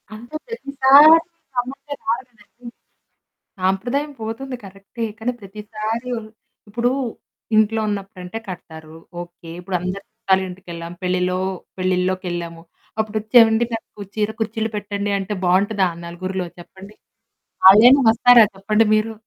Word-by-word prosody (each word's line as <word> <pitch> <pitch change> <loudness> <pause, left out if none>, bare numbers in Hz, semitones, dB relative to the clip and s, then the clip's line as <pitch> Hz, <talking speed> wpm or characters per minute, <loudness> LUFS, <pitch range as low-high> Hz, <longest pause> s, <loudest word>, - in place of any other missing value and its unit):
అంటే 240 +7 -11
ప్రతిసారి. 285 - +6 0.4
సమస్య 265 +4 -4 0.2
కాదు 235 +3 +1 0.2
కాదండి. 235 +4 -17 0.9
సాంప్రదాయం 245 +11 0
పోతుంది 250 +4 -5
కరెక్టే, 195 +4 -7
కానీ 245 +3 -1
ప్రతిసారి 215 +4 -5
ఉన్ 215 -1 -10 0.4
ఇప్పుడు 240 +4 0 0.7
ఇంట్లో 220 +1 +3
ఉన్నప్పుడంటే 195 0 -5
కడతారు 160 -3 -9 0.3
ఓకే, 175 -1 -13
ఇప్పుడు 180 0 -2
అందరు 185 +2 -4
చుట్టాలింటికెళ్ళాము 180 -3 -3
పెళ్ళిలో 180 0 0 0.4
పెళ్లిల్లోకెళ్ళాము. 180 -2 -2 0.4
అప్పుడొచ్చే 215 +2 -2
ఎవండి 225 +1 +3
నాకు 215 -2 -8
చీర 215 0 0
కుచ్చిళ్ళు 220 0 -2
పెట్టండి 205 0 -3
అంటే, 195 +2 -4
బావుంటుందా 190 +1 +2 0.2
నలుగురిలో 185 +1 -4
చెప్పండి? 195 +4 -14 0.7
వాళ్ళైనా 240 +8 +9
వస్తారా 235 0 +7
చెప్పండి 215 +3 +2
మీరు? 220 +1 0
210 Hz, 110 wpm, -21 LUFS, 185-225 Hz, 0.9 s, వాళ్ళైనా